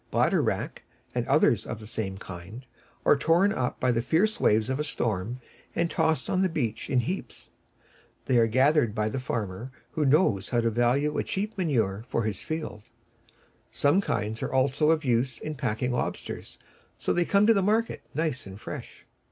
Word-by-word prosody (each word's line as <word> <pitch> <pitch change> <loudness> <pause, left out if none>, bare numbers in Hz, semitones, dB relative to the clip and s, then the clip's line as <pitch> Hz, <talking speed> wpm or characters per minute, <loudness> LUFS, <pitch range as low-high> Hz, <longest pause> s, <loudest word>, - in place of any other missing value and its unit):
The - - -39
Bladder - - +3
Wrack, - - -2 0.3
and - - -1
others - - +3
of - - -5
the 105 - -10
same 105 -3 -3
kind, 95 +7 -9 0.4
are - - +6
torn 165 +7 +3
up 125 -1 -2
by 125 - +2
the 115 -1 +1
fierce 180 - +2
waves 110 0 +3
in 130 +2 -1
a - - +1
storm, 115 -5 -2 0.4
and 170 0 0
tossed 160 -1 +1
on 185 - +1
the 190 - +2
beach 120 -10 -2
in 130 -2 +3
heaps. 185 +9 -5 0.7
They 125 -2 +3
are 115 - +4
gathered 130 -1 +3
by 110 -1 0
the 130 - -3
farmer 115 -1 -4 0.2
who 155 - -1
knows 135 - +3
how 120 - +2
to 115 0 +1
value 125 +6 +1
a - - +1
cheap 210 +3 -3
manure 115 - 0
for 115 -1 -1
his 105 -3 -2
fields. 155 -9 -5 0.8
Some 145 +7 +3
kinds 110 - -2
are - - -2
also 135 +3 +2
of 160 -2 +2
use 120 0 +1
in 155 +6 -5
packing 125 -3 -1
lobsters 120 - -4 0.4
so - - 0
that - - -4
they - - +2
come 200 +3 +4
to 215 -3 +5
market 220 +4 +1
nice 155 -8 -1
and 95 +1 -10
fresh. - - -8
130 Hz, 190 wpm, -27 LUFS, 110-160 Hz, 0.8 s, are